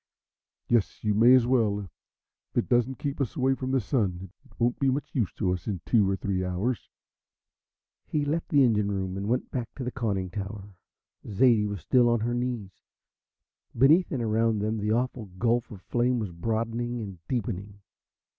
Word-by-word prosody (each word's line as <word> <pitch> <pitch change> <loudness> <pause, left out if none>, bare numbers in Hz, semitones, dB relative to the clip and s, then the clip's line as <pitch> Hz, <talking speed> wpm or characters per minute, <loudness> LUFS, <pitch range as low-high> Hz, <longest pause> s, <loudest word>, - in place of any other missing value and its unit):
"Yes, 115 -4 +1
you 105 -1 +2
may 120 +5 +7
as 125 -2 +4
well. 110 -5 +2
If 95 - -16
it - - +1
doesn't 120 +1 +2
keep 140 -1 -3
us 130 - -2
away 130 +1 +2
from 130 0 -4
the 135 0 +2
Sun 95 -6 -1
it 130 - -23
won't 120 +1 +1
be 135 - +3
much 140 +3 -2
use 115 -8 0
to 90 -4 0
us 90 - -6
in 100 -4 -2
two 105 -5 +3
or 95 - +1
three 95 -1 -2
hours." 95 +7 -2 1.2
He 150 -1 0
left 160 +3 -2
the 145 -5 +5
engine 105 -4 +2
room 95 -1 -2
and 100 +1 -4
went 125 +2 -1
back 120 -3 -3
to 135 - -5
the 125 - -3
conning 100 -8 -2
tower. 100 +1 -6 0.5
Zaidie 110 0 +4
was 100 -4 -5
still 120 - +4
on 120 -2 +2
her 120 +2 -1
knees. 120 -5 -2 1.1
Beneath 155 +8 +5
and 125 -4 -1
around 110 0 +2
them 110 +2 -1
the 105 +1 -1
awful 120 0 -1
gulf 120 +2 +1
of 100 -5 -11
flame 125 +1 +1
was 105 -5 -3
broadening 115 +6 -2
and 100 -5 -7
deepening. 100 -4 -3
115 Hz, 185 wpm, -27 LUFS, 100-125 Hz, 1.2 s, may